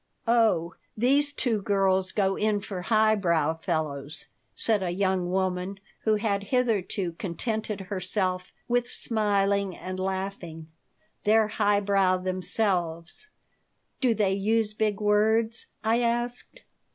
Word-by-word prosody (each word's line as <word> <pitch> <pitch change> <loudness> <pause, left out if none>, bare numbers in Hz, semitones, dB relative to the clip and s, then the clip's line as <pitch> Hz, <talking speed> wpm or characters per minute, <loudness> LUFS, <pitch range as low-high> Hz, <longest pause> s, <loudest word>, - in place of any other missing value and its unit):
"Oh, 220 -8 +3 0.2
these 280 +5 +3
two 235 -7 0
girls 190 -2 +2
go 195 -2 +1
in 210 -1 +1
for 195 -2 -6
highbrow 180 -7 +2
fellows," 155 -3 -3 0.3
said 215 -3 +1
a 185 - -1
young 185 -1 0
woman 185 +1 -1 0.3
who 220 -1 +4
had 205 -2 -1
hitherto 210 -6 0
contented 215 +3 -3
herself 185 -1 -2 0.2
with 245 0 0
smiling 200 -3 0
and 185 0 -6
laughing. 190 -4 -4 0.5
"They're 215 0 +4
highbrow 200 -3 +2
themselves." 185 - -1 0.7
"Do 245 -4 +2
they 200 -3 +1
use 215 +2 +1
big 215 -2 -1
words?" 220 +2 +2 0.2
I 225 +2 +2
asked. 240 - -2
200 Hz, 115 wpm, -27 LUFS, 185-220 Hz, 0.7 s, who